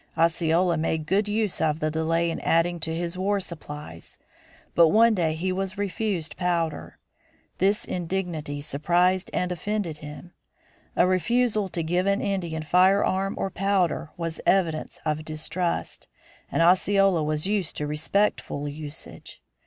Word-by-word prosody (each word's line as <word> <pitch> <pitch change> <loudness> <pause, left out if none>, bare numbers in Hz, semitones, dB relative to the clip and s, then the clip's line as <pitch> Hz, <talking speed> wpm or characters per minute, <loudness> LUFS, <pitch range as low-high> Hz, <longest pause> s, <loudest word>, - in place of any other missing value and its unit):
Osceola 170 +1 +2
made 160 0 -1
good 200 +5 +1
use 210 -2 -1
of 155 -1 +1
the 155 0 0
delay 165 +1 +1
in - - -4
adding 170 +1 +1
to 160 0 -2
his 170 +2 -3
war 200 +2 +1
supplies; 150 - -8 0.6
but 170 -1 +6
one 225 +6 +5
day 165 -5 0
he 185 +4 -1
was 190 +1 -3
refused 200 -4 -2
powder. 170 -3 -1 0.6
This 200 +3 +2
indignity 170 -5 -3
surprised 175 +6 +1
and 180 0 -1
offended 180 -3 -3
him. 150 +4 -10 0.6
A - - +5
refusal 210 +2 +1
to 170 -2 -2
give 175 +4 0
an 200 0 +2
Indian 175 -6 -2
firearms 190 +3 +3
or 195 - -2
powder 190 -4 0
was 165 -2 -4
evidence 165 -5 +1
of 155 0 -1
distrust, 160 +3 -3 0.4
and 165 - +2
Osceola 190 0 +4
was 150 +1 -1
used 200 -4 -1
to 150 - -2
respectful 150 -1 -1
usage. 145 0 -8
175 Hz, 140 wpm, -25 LUFS, 160-195 Hz, 0.6 s, but